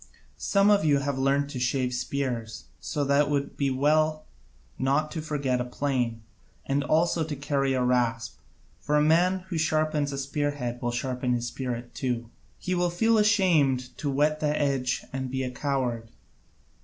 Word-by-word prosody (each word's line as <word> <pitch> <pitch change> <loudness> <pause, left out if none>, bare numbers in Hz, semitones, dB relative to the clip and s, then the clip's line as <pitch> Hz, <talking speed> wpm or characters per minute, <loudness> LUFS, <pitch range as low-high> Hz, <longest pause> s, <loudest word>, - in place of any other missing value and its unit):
Some 200 +1 +3
of 205 -4 +4
you 145 -2 +4
have 140 -1 -2
learnt 140 +1 +1
to 130 - -5
shave 125 0 0
spears, 125 - -3 0.2
so 145 - -2
that 140 +1 +3
it - - -5
would 140 -1 -1
be 140 - 0
as 130 - -1
well 155 +3 +2 0.5
not 140 +4 +1
to 160 - -4
forget 140 -5 -1
a - - 0
plane, 125 -3 -2 0.4
and 140 +1 0
also 165 +2 +2
to 155 -1 -4
carry 140 -1 0
a 130 -1 +1
rasp, 115 -5 0 0.4
for 150 - -1
the 150 0 +4
man 180 +4 +3
who 170 -4 -2
sharpens 155 -2 +1
a 140 - -4
spearhead 140 -3 -2
will 120 - -1
sharpen 125 +1 -1
his 120 0 -2
spirit 120 -1 -5
too. 120 -3 -3 0.3
He 185 - -3
will 175 0 +1
feel 225 +6 +2
ashamed 155 -12 +2
to 145 - -2
whet 150 +3 +1
the 150 0 0
edge 135 -3 0
and 130 -1 -3
be 130 +1 -2
a 125 - -3
coward. 125 -4 -2
140 Hz, 180 wpm, -27 LUFS, 125-155 Hz, 0.5 s, of